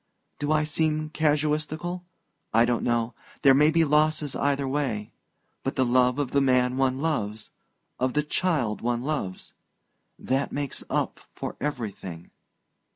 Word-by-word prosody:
Do 145 +1 -1
I 155 0 +3
seem 155 0 0
casuistical? 155 +3 0 0.5
I 115 +1 +6
don't 120 -1 0
know 120 0 0 0.3
there 135 -2 +8
may 150 +3 +5
be 165 0 +3
losses 150 -1 +2
either 140 -1 +1
way...but 130 -7 -5
the 130 - +2
love 125 +1 +3
of 145 -3 -1
the 140 - +3
man 125 -1 +3
one 130 -1 +1
loves...of 125 -2 -4
the 150 - +3
child 150 - 0
one 120 0 -1
loves... 135 -11 -3 0.6
that 135 +2 -1
makes 145 -2 -3
up - - -1
for - - -6
everything...." 100 - -5
140 Hz, 135 wpm, -26 LUFS, 125-150 Hz, 0.6 s, there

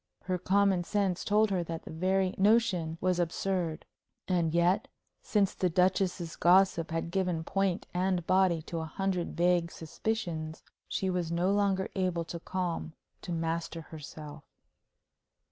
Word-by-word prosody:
Her 185 -1 -1
common 195 -1 +3
sense 195 -1 0
told 210 0 +3
her 180 -2 +1
that 165 0 -5
the - - -9
very 185 +3 +1
notion 190 -6 +3
was 185 -1 +1
absurd. 175 -1 -1 0.4
And 175 -3 +1
yet, 175 +5 +2 0.3
since 200 -3 +1
the 180 - 0
Duchess's 180 -1 +1
gossip 180 -2 +4
had 165 0 -3
given 180 -3 0
point 195 +1 0
and 180 -1 0
body 185 -4 +3
to 165 +1 -4
a 160 - -3
hundred 180 +1 -2
vague 175 -1 +3
suspicions, 160 -2 -4 0.2
she 190 -1 -1
was 175 -2 -1
no 175 +3 +1
longer 200 -2 +1
able 180 -3 -1
to 170 +1 -6
calm, 175 -3 -3 0.3
to 175 - -6
master 165 0 -2
herself. 150 -1 -10
180 Hz, 145 wpm, -30 LUFS, 165-190 Hz, 0.4 s, gossip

